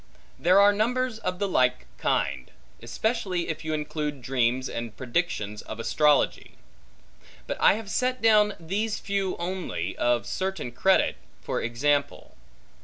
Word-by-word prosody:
There 180 +4 +5
are 205 +1 +6
numbers 240 +2 0
of 185 -4 -3
the 200 - -1
like 125 - +1
kind; 70 -2 -1 0.3
especially 180 - -2
if 155 - -4
you 155 - -3
include 150 -2 -4
dreams, 125 0 +1
and 115 -2 -6
predictions 120 - -2
of - - -8
astrology. 150 +4 +2 0.9
But - - -4
I - - +7
have 215 0 -6
set 255 0 0
down 210 -3 +4
these 205 +6 -2
few 200 -2 -2
only, 170 - -4
of 120 -1 +1
certain 190 -9 -3
credit, 190 +10 +2 0.3
for - - -2
example. 140 +5 -1
170 Hz, 135 wpm, -26 LUFS, 125-200 Hz, 0.9 s, I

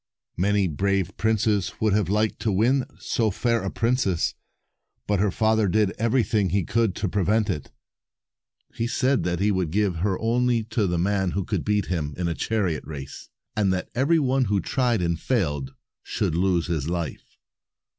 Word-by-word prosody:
Many 100 +2 +2
brave 95 +3 -1
princes 110 -2 +1
would 110 -2 +2
have 100 -4 +1
liked 105 +2 +1
to 110 - 0
win 120 +7 +2
so 115 -2 0
fair 115 +3 0
a 95 - -2
princess, 115 -8 0 0.7
but 105 -2 +1
her 105 +1 +2
father 110 +1 +2
did 100 +1 +2
everything 110 -4 +2
he 95 +2 +1
could 110 +1 0
to 105 - -1
prevent 105 +3 +1
it. 75 - -5 1.0
He 115 - -2
said 130 +2 +1
that 90 -1 -1
he 105 +2 +2
would 95 -4 0
give 100 0 0
her 95 +2 0
only 120 0 +1
to 110 -3 +1
the 90 -1 0
man 95 +1 +1
who 100 - -1
could - - -2
beat 105 -1 +1
him 75 -5 -3
in 90 - -2
260 85 - 0
a 80 - -4
chariot 100 -8 0
race, 70 -4 -8 0.3
and 100 -3 +2
that 90 - -3
every 140 +7 +3
one 135 -3 +2
who 100 -2 +1
tried 120 0 0
and 85 -1 0
failed 75 - -1 0.3
should - - -2
lose 90 0 +1
his 80 -3 -2
life. 85 -3 -5
100 Hz, 180 wpm, -25 LUFS, 90-110 Hz, 1.0 s, every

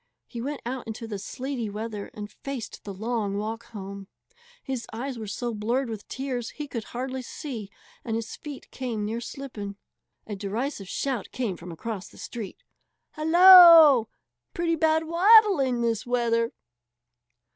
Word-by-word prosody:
He 235 - -7
went 285 +4 -4
out 250 0 -4
into 225 +1 -6
the 205 -3 -5
sleety 250 +2 -4
weather 210 0 -5
and 210 -1 -7
faced 270 0 -7
the 205 - -5
long 210 0 -2
walk 225 +2 -4
home. 200 -3 -8 0.6
His 260 -5 -4
eyes 245 +2 -5
were 215 - -6
so 235 +4 -3
blurred 235 +4 -1
with 215 -2 -7
tears 255 -3 -4
he 295 -1 -7
could 230 -5 -5
hardly 260 +1 -4
see 240 -5 -7 0.3
and 225 - -2
his 230 0 -4
feet 295 -4 -10
came 235 -5 -3
near 225 +3 -3
slipping. 235 -7 -7 0.5
A 210 - -5
derisive 205 +1 -4
shout 255 -3 -2
came 235 -8 -2
from 175 +1 -10
across 200 +3 -5
the - - -17
street: 220 -6 -7 0.5
"Hallo! 330 - +9 0.5
Pretty 335 -1 +1
bad 320 0 +2
'waddling' 335 - +5
this 230 -2 0
weather!" 230 -1 +1
235 Hz, 150 wpm, -26 LUFS, 215-275 Hz, 0.6 s, Hallo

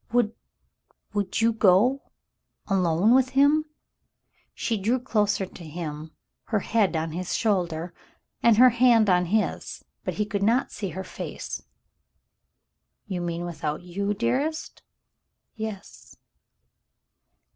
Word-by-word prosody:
Would 235 -2 +2 0.4
— - - -42
would 205 +1 -1
you 230 0 +3
go 220 +6 +3 0.3
— - - -54
alone 185 +2 +3
with 260 0 +4
him? 295 +3 +5 0.4
" - - -56 0.3
She 230 - -1
drew 220 +5 +1
closer 210 -5 0
to 185 -1 -12
him, 155 -1 -6 0.4
her 215 -3 0
head 210 -5 +1
on 160 0 -1
his 180 +2 -3
shoulder 175 -5 -1 0.5
and 230 -2 +5
her 255 +2 +8
hand 235 -2 +4
in 180 -1 +3
his, 210 +5 -2 0.2
but - - -3
he 210 - 0
could 205 -1 -3
not 230 +6 +2
see 200 -2 -4
her 190 +3 -5
face. - - -6 1.4
"You 185 -4 -4
mean 170 0 -3
without 155 -1 -4
you, 200 +3 -2
dearest? 265 +9 -2 0.4
" - - -54
"Yes." 215 -3 -8
205 Hz, 135 wpm, -25 LUFS, 175-230 Hz, 1.4 s, her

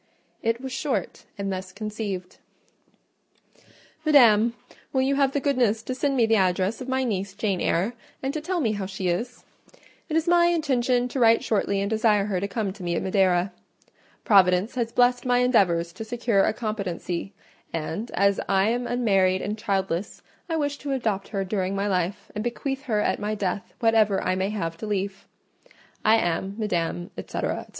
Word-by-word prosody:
It 230 +1 0
was 265 0 -6
short, 255 - -3
and 195 -1 -2
thus 185 0 -6
conceived:— 205 -3 -5 1.7
"MADAM,— 235 -7 +5 0.4
"Will 260 -1 +2
you 270 +1 +2
have 275 -1 +2
the 285 - +1
goodness 245 -6 +1
to 255 - -3
send 275 +1 0
me 235 - +5
the 225 0 +3
address 190 +3 +1
of 255 - -6
my 260 0 +1
niece, 195 -4 -2
Jane 200 -4 -1
Eyre, 190 +8 +1 0.3
and 270 +1 -1
to 310 - -3
tell 355 +2 -1
me 225 -6 +1
how 200 -3 -3
she 190 -1 -3
is? 240 +8 -3 0.7
It 315 - +1
is 325 +1 0
my 345 0 +5
intention 255 -7 +1
to 265 - -3
write 230 -1 +5
shortly 200 -2 0
and 200 - 0
desire 215 -2 +2
her 195 -3 -1
to 200 - -2
come 200 -2 -2
to 200 - -13
me 175 -1 -1
at - - -1
Madeira. 185 -1 +2 0.7
Providence 190 0 +4
has 235 -2 -2
blessed 245 +1 +3
my 245 -1 +2
endeavours 185 -9 +2
to 205 - -6
secure 225 -3 +1
a - - +2
competency; 200 -4 -4 0.4
and 165 +8 -4
as 200 0 +3
I 195 +2 +3
am 240 +1 -1
unmarried 195 -6 +2
and 205 +2 -2
childless, 195 -3 -2 0.3
I 325 - 0
wish 285 -2 -1
to 280 -1 -3
adopt 215 -7 -1
her 195 -3 -2
during 190 0 -2
my 200 +1 -1
life, 190 +1 -2
and 210 - -3
bequeath 270 +3 -3
her 215 -5 +1
at - - 0
my 210 +1 -2
death 200 -1 -3
whatever 220 -4 +3
I 185 - +1
may 190 +1 -1
have 165 -6 -3
to 215 - -6
leave. 200 -1 -3 0.8
I 220 - +6
am, 190 -1 -1
Madam, 175 -5 -2
&c., - - -5
&c. - - -4
210 Hz, 185 wpm, -25 LUFS, 190-245 Hz, 1.7 s, I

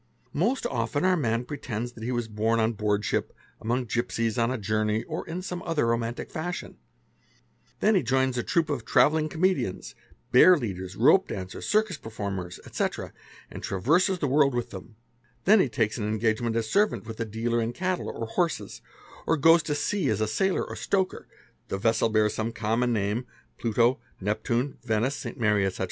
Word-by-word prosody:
Most 225 - 0
often 125 +5 -1
our 185 0 +4
man 120 -6 0
pretend: 120 -5 -4
that 120 -2 -13
he 120 - -2
was 120 -2 -1
born 110 +1 0
on 110 +1 +2
boardship, 105 -1 -1 0.3
among 120 +3 -1
gipsies, 115 -1 -1
on 115 0 +2
a 130 - -1
journey, 110 +1 0
or - - -5
in 180 +3 -4
some 180 -1 -4
other 165 -7 0
romantic 115 0 -2
fashion; 175 +3 -5 1.0
then 215 - +4
he 190 - +4
joins 130 +1 +1
a 120 - 0
troup 165 +5 +1
of 145 - -2
travelling 155 +1 +3
comedians 175 - 0 0.4
bearleaders, 105 - +4
rope - - +5
dancers, 95 -1 -6
circus 215 -5 +2
performers, 100 -6 -5
etc., - - -3 0.4
and - - -7
traverses 165 - +2
the 150 - -1
worl 140 +1 +4
with 120 -3 -3
them; 100 +4 -10 0.5
then 210 +3 +7
he 140 - +3
takes 110 0 0
an 105 - -1
engagement 110 +1 0
as 115 -1 0
servant 205 - +1
with 110 +1 -8
a - - +1
dealer 115 +2 -1
11 115 0 -1
cattle 185 +5 -2
or 115 - -4
horses, 170 +9 -2 0.5
or 165 - +3
goes 165 +3 +6
to 150 -2 -2
sea 150 +1 0
as 105 - 0
a 110 - +1
sailor 185 - +1
or - - -6
stoker, 190 -2 -1 0.4
the 95 - -2
vessel 115 +2 +2
bear 110 -1 +3
some 110 +2 -2
common 115 +2 0
name 110 +3 -1 0.3
(Pluto, 115 +2 +2 0.2
Neptune, 115 +6 -1
Venice, 115 +3 0
St. - - -7
Mary, 105 -3 +3
ete. 95 - -5
120 Hz, 180 wpm, -27 LUFS, 110-150 Hz, 1.0 s, then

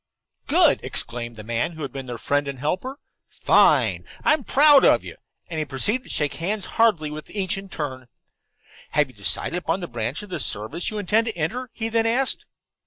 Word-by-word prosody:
"Good!" - - +4
exclaimed 120 0 -2
the 110 - -10
man 115 +8 -2
who 160 -1 -7
had 140 - -5
been 135 -1 -7
their 120 -1 -5
friend 145 +4 0
and 140 -1 -5
helper. 185 - -3 0.3
"Fine! - - +3 0.2
I'm 305 -3 +3
proud 290 +2 +6
of - - +4
you," - - -9 0.3
and 160 -2 -4
he 155 - -1
proceeded 205 - +1
to - - -14
shake 150 -2 -1
hands 200 +5 -2 0.2
heartily 170 -10 +3
with 155 0 -8
each 195 -3 -1
in 195 0 -8
turn. 130 -7 -5 0.9
"Have 150 -2 +2
you - - -26
decided 100 - 0
upon 175 +1 -2
the 175 - -5
branch 120 - -4
of 205 - -12
the - - -3
service 110 +12 -1
you 215 - -6
intend 215 +3 +1
to 220 - -4
enter?" 240 +11 -3
he 225 - -3
then 225 0 +1
asked. 255 +4 -1
165 Hz, 200 wpm, -23 LUFS, 135-220 Hz, 0.9 s, proud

